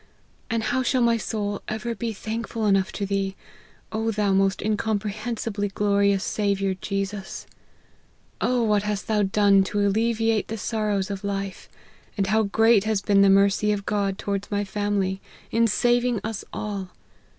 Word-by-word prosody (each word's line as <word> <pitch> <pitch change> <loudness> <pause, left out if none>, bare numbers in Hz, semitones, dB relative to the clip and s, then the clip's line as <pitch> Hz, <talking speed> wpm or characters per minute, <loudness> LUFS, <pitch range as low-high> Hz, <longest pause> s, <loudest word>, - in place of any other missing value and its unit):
And 230 -1 0
how 260 - 0
shall 255 0 +2
my 235 0 +3
soul 205 -2 -3
ever 220 +2 -3
be 230 +1 -3
thankful 220 +1 -4
enough 195 -2 +2
to 200 - -2
thee, 195 -1 -1 0.6
O 220 +1 -1
thou 205 -2 +1
most 195 0 +2
incomprehensibly 215 0 -2
glorious 200 0 +2
Saviour 200 -2 0
Jesus! 195 -1 -4 1.0
O 250 -1 +2
what 210 -2 +2
hast 210 -1 -3
thou 220 - 0
4 205 - +3
done 195 0 +4
to 205 +2 -2
alleviate 225 +1 +1
the 225 - -4
sorrows 210 -2 -1
of 200 0 -5
life! 195 -1 -4 0.5
and 195 - +1
how 215 +3 +2
great 220 0 +4
has 215 -3 0
been 200 -1 +4
the 200 - +6
mercy 200 +2 +4
of 200 -1 -2
God 200 -2 0
towards 200 -1 -3
my 205 0 0
family, 200 -1 -1 0.3
in 230 0 +3
saving 240 +3 +2
1 205 - -3
us 220 -2 -4
all 200 -3 -4
205 Hz, 160 wpm, -24 LUFS, 195-220 Hz, 1.0 s, the